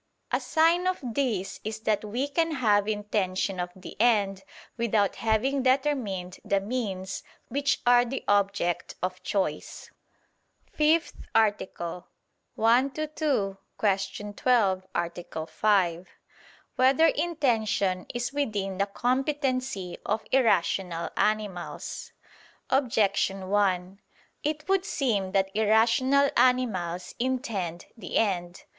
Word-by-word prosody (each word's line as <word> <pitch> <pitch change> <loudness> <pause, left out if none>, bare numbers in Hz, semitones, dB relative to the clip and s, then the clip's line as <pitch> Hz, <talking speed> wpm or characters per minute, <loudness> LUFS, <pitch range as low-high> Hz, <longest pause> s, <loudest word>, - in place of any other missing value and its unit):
A - - +2
sign 335 +3 +2
of 370 - +1
this 230 -6 -2
is 220 +1 -5
that 215 -1 0
we 240 +7 -2
can 325 +2 0
have 210 -7 +2
intention 200 -3 -1
of 180 0 -2
the 185 - -10
end 205 -5 +3 0.3
without 220 -4 +1
having 230 +5 +1
determined 255 -9 0
the 200 - +1
means 195 -4 -3 0.3
which 280 +1 0
are 245 0 +6
the 255 +2 -4
object 200 -3 +1
of 185 0 -2
choice. 185 -7 -3 0.8
________________________ - - -30
FIFTH 315 +2 +2 0.2
ARTICLE 190 -5 0 0.5
[I 240 +5 +4
II, 310 0 -1
Q. 215 -12 0 0.4
12, 205 0 0
Art. 170 0 -2 0.3
5] 180 -1 +2 0.7
Whether 265 +5 +5
Intention 225 - +1
Is 240 +2 -3
Within 205 -9 -2
the 200 - +2
Competency 255 - -1
of 215 +2 -1
Irrational 190 -8 +1
Animals? 210 -5 -2 0.6
Objection 200 -7 +1
1: 195 -2 +1 0.4
It 305 +1 -3
would 385 -1 +2
seem 220 - -1
that 195 0 +1
irrational 230 +6 +3
animals 190 -9 +1
intend 230 - -2
the 205 -7 -4
end. 180 -5 -1
215 Hz, 110 wpm, -27 LUFS, 190-260 Hz, 0.8 s, are